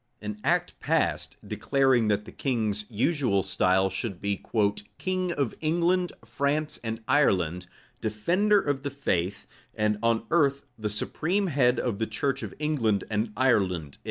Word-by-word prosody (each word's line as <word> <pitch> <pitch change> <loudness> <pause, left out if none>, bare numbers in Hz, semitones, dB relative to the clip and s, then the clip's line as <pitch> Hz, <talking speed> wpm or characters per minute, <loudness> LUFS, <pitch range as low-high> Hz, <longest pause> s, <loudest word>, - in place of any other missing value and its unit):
An 105 0 -5
act - - 0
passed, - - 0
declaring 135 -5 +2
that 105 0 +1
the - - -10
king's 110 -6 -1
usual 120 - +1
style 95 +1 +2
should 95 -1 -4
be 100 -1 -2 0.5
"king 185 -1 -1
of 140 -8 -1
England, 175 +3 +2
France, 145 +6 -1
and 115 0 -4
Ireland, 90 - +2 0.3
defender 180 - +2
of 145 -7 -1
the 140 - -3
faith, 100 -9 -1 0.3
and 105 -1 +1
on 115 -1 +2
earth 140 -4 +2
the 110 -2 -3
supreme 165 - -1
head 125 -3 +3
of 115 -5 -2
the 110 - 0
church 135 +5 -1
of - - -6
England 120 -10 +1
and 105 +1 0
Ireland." 95 - +1
120 Hz, 145 wpm, -27 LUFS, 105-145 Hz, 0.5 s, head